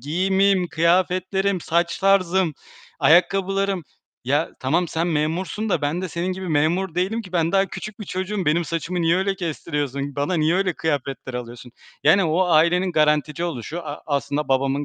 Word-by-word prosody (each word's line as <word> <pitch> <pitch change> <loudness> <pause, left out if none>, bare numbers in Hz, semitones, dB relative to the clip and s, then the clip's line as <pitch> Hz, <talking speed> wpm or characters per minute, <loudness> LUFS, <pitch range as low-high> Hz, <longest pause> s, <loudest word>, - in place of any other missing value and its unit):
giyimim, 190 +5 +1
kıyafetlerim, 185 +3 +1
saç 170 +1 0
tarzım, 190 -3 +2 0.5
ayakkabılarım. 195 +2 +2 0.4
Ya, 145 +4 +1
tamam, 165 +6 +1
sen 165 +2 -1
memursun 170 +7 -1
da 165 -6 0
ben 160 +6 -1
de 185 - -3
senin 175 +3 -2
gibi 185 -1 -6
memur 165 +4 +1
değilim 195 +6 -1
ki. 185 -4 -13
Ben 165 0 +1
daha 195 0 +3
küçük 215 +2 -8
bir 210 - -5
çocuğum. 190 +1 -3
Benim 170 +3 +2
saçımı 165 +3 -3
niye 165 +2 +3
öyle 195 +1 0
kestiriyorsun? 145 -5 -4
Bana 145 +6 0
niye 160 +1 +2
öyle 190 -1 +1
kıyafetler 140 -5 -3
alıyorsun? 120 0 -7 0.3
Yani, 190 +5 +5
o 165 +4 +2
ailenin 175 +3 +3
garantici 150 +1 +1
oluşu, 160 +3 -5
a 145 - -7
aslında 145 0 -1
babamın 135 +2 +1
170 Hz, 160 wpm, -22 LUFS, 150-190 Hz, 0.5 s, Yani